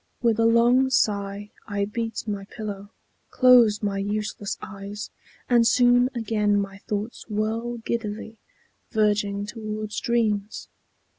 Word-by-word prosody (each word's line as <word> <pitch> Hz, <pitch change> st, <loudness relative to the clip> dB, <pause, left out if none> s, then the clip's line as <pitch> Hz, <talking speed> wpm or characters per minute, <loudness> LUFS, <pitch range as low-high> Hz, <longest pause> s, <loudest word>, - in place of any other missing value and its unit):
With 230 Hz, -2 st, +2 dB
a 225 Hz, -, +5 dB
long 240 Hz, +3 st, +4 dB
sigh, 205 Hz, -4 st, 0 dB, 0.2 s
I 200 Hz, -1 st, -1 dB
beat 225 Hz, +2 st, -4 dB
my 200 Hz, -2 st, -3 dB
pillow, 205 Hz, -2 st, -7 dB, 0.4 s
close 240 Hz, -5 st, +5 dB
my 200 Hz, -1 st, -1 dB
useless 205 Hz, 0 st, -3 dB
eyes, 200 Hz, +1 st, -8 dB, 0.4 s
And 235 Hz, -2 st, +4 dB
soon 245 Hz, +1 st, +4 dB
again 210 Hz, -3 st, +1 dB
my 195 Hz, -1 st, -5 dB
thoughts 210 Hz, +3 st, -5 dB
whirl 225 Hz, +3 st, -2 dB
giddily, 220 Hz, -1 st, -4 dB, 0.5 s
Verging 205 Hz, -2 st, +1 dB
towards 215 Hz, -1 st, -5 dB
dreams. 215 Hz, -3 st, -1 dB
215 Hz, 120 wpm, -25 LUFS, 205-230 Hz, 0.5 s, a